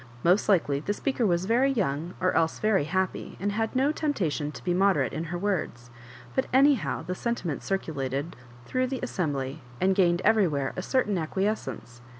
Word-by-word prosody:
Most 185 +5 +3
likely 150 -8 +3
the 200 +8 -2
speaker 255 -3 0
was 175 0 +1
very 245 +6 +3
young, 175 - -1
or 185 0 +1
else 160 0 +1
very 215 -8 +2
happy, 185 +3 -2
and 200 +3 -1
had 225 +3 -2
no 270 +3 +3
tempta 290 - 0
tion 145 0 -3
to - - -10
be 175 - 0
moderate 195 +1 +2
in 160 - -3
her 175 +2 -4
words; 170 -11 -2 0.4
but - - 0
anyhow 275 -1 +3
the 180 - -3
sentiment 185 - -3
circulated 145 -5 -3 0.3
through 255 - 0
the 260 0 -4
assembly^ 145 - -2 0.2
and 190 +1 +3
gained 175 -2 +2
everywhere 155 -11 +2
a - - -3
certain 210 -4 +1
acquiescence. 155 - -3
185 Hz, 175 wpm, -27 LUFS, 155-215 Hz, 0.4 s, Most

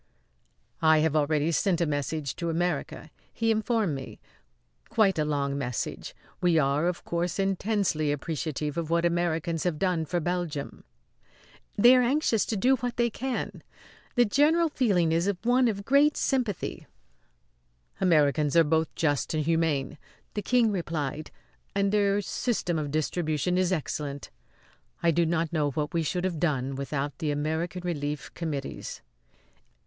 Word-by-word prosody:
"I 160 -1 +5
have 160 -1 +1
already 150 +1 +2
sent 180 +1 +1
a 170 - +2
message 145 -1 -2
to 170 -1 -2
America," 175 +2 -2 0.2
he 225 0 0
informed 220 - +1
me; 135 -1 -7 0.7
"quite 200 -6 +3
a 150 - +2
long 140 -2 -1
message. 125 -3 -4 0.3
We 175 -2 +3
are, 145 +2 +2
of 180 -1 -3
course, 170 0 -2
intensely 195 -5 0
appreciative 150 0 -3
of 165 -2 -2
what 170 +1 +2
Americans 170 -1 0
have 175 -4 -1
done 175 -2 0
for 175 +3 -1
Belgium." 170 -4 -3 0.9
"They 240 +5 +7
are 250 - +5
anxious 245 -4 +1
to 220 - -1
do 260 +6 +3
what 245 0 -4
they 240 -1 +2
can. 260 +3 -4 0.5
The 245 -1 +5
general 310 +9 +3
feeling 195 - +2
is 170 +5 +2
one 245 +1 +4
of 200 -3 -2
great 285 +2 +4
sympathy." 245 - -1 1.1
"Americans 150 -4 +3
are 165 - +7
both 160 +1 0
just 145 -2 0
and 155 -1 0
humane," 155 -3 0 0.3
the 210 - -2
King 240 -1 +3
replied; 155 -5 -3 0.5
"and 200 0 +2
their 205 -1 +2
system 190 -6 -1
of 150 -2 -3
distribution 155 +2 -1
is 185 0 +2
excellent. 145 -4 -3 0.7
I 170 - +4
do 170 +1 +2
not 165 0 -1
know 150 -3 +1
what 150 +2 -3
we 170 - +1
should 175 +3 -2
have 180 -4 -2
done 140 -5 0
without 140 +1 -3
the 155 - -1
American 160 +5 -2
Relief 150 -4 -3
Committees." 150 -5 -5
170 Hz, 150 wpm, -27 LUFS, 150-200 Hz, 1.1 s, They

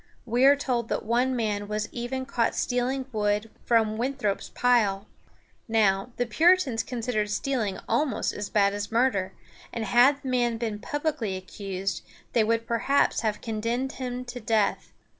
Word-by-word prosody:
We 245 +2 +2
are 280 +1 +8
told 245 -5 -2
that - - -2
one 245 +3 +1
man 210 -3 -1
was 210 0 -2
even 255 +2 -4
caught 235 -3 0
stealing 255 +2 -1
wood 210 0 0
from 220 -2 +2
Winthrop's 250 -5 -1
pile. 215 -5 +2 0.6
Now, 215 -1 +2
the 245 - +1
Puritans 310 - +3
considered 230 -3 -2
stealing 220 -4 -1
almost 290 -7 0
as 205 -1 -5
bad 200 -1 +3
as 205 +1 -4
murder, 225 -6 +1 0.4
and 230 -2 -3
had 260 +5 +4
the 265 - -4
man 240 -2 +1
been 220 -3 -3
publicly 280 -9 -2
accused, 190 0 -4 0.3
they 230 - +4
would 230 +1 0
perhaps 235 +5 +2
have 215 -2 -1
condemned 230 +4 -2
him 250 -1 -5
to 245 0 -7
death. 220 -2 0
230 Hz, 155 wpm, -26 LUFS, 210-250 Hz, 0.6 s, are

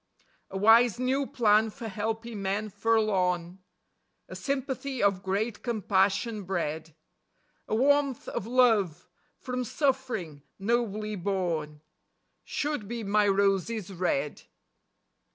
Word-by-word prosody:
A 190 - -5
wise 225 +2 +5
new 260 +2 0
plan 220 -1 +3
for 230 +1 -8
helping 220 +1 -4
men 200 +2 -1
forlorn; 190 -5 +1 0.7
A - - -9
sympathy 270 -2 -3
of 195 -2 +2
great 205 +4 -2
compassion 205 -1 +1
bred; 160 -4 -3 0.7
A - - 0
warmth 280 +1 +2
of 205 - -4
love 225 -9 +2 0.3
from 250 -1 -3
suffering 240 - -1 0.2
nobly 215 0 -1
borne, 170 -6 -2 0.6
Should 290 -8 -3
be 235 +1 -4
my 205 +1 +2
roses 195 +1 +1
red. 150 -5 -1
210 Hz, 105 wpm, -28 LUFS, 190-235 Hz, 0.7 s, wise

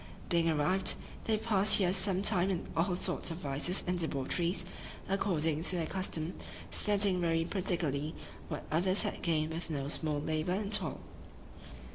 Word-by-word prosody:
Being 170 -2 +3
arrived, 175 +5 +3 0.3
they 220 -1 +2
passed 215 -2 +3
here 185 -3 +2
some 190 0 0
time 190 -3 +3
in 185 -3 -2
all 180 +2 +1
sorts 180 0 0
of 165 - -4
vices 150 +4 -1
and 180 0 -1
debaucheries, 170 +4 -1 0.4
according 165 -6 0
to 180 - +1
their 170 -2 -1
custom; 180 -3 -2 0.4
spending 200 -3 +2
very 165 -1 +1
prodigally 165 -6 -1 0.3
what 150 - -5
others 185 +6 +2
had 205 - -3
gained 160 -2 0
with 165 +1 -5
no 140 -3 -3
small 150 -1 -2
labor 155 +3 -1
and 205 +2 -2
toil. - - +1
175 Hz, 155 wpm, -32 LUFS, 160-190 Hz, 0.4 s, Being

